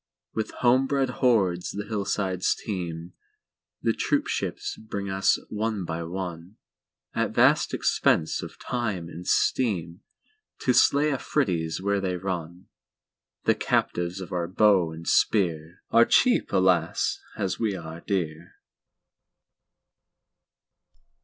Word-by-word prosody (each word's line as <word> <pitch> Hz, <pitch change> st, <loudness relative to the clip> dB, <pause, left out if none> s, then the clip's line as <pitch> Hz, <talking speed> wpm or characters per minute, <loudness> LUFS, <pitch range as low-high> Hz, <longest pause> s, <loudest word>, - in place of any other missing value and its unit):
With 110 Hz, -, -2 dB, 0.2 s
home 130 Hz, +2 st, +5 dB
bred 135 Hz, -2 st, +1 dB
hordes 95 Hz, -9 st, +2 dB
the 105 Hz, 0 st, -5 dB
hillsides 100 Hz, -3 st, -1 dB
teem. 85 Hz, -4 st, -5 dB, 0.7 s
The -, -, +2 dB
troopships -, -, -1 dB
bring 100 Hz, -3 st, -5 dB
us 95 Hz, 0 st, +3 dB
one 105 Hz, -3 st, -2 dB
by 85 Hz, 0 st, -4 dB
one, 90 Hz, +2 st, -6 dB, 0.6 s
At -, -, -1 dB
vast -, -, +4 dB
expense 80 Hz, -, +1 dB
of -, -, -9 dB
time 105 Hz, -9 st, -3 dB
and 90 Hz, +1 st, -9 dB
steam, 90 Hz, -9 st, +1 dB, 0.6 s
To 125 Hz, -, +2 dB
slay 145 Hz, +4 st, +4 dB
Afridis 90 Hz, -, -1 dB
where 100 Hz, 0 st, 0 dB
they 95 Hz, -2 st, -1 dB
run. 90 Hz, -1 st, -5 dB, 0.8 s
The -, -, +4 dB
"captives 90 Hz, +2 st, -1 dB
of 90 Hz, -, -8 dB
our 85 Hz, -1 st, -1 dB
bow 95 Hz, -3 st, +3 dB
and 80 Hz, +1 st, -9 dB
spear"Are 90 Hz, +3 st, +2 dB
cheap, 250 Hz, -1 st, +3 dB
alas! 90 Hz, -3 st, +2 dB, 0.2 s
as 95 Hz, -3 st, -2 dB
we 110 Hz, -4 st, 0 dB
are 80 Hz, -1 st, -8 dB
dear. 85 Hz, -4 st, -3 dB
95 Hz, 115 wpm, -26 LUFS, 85-105 Hz, 0.8 s, home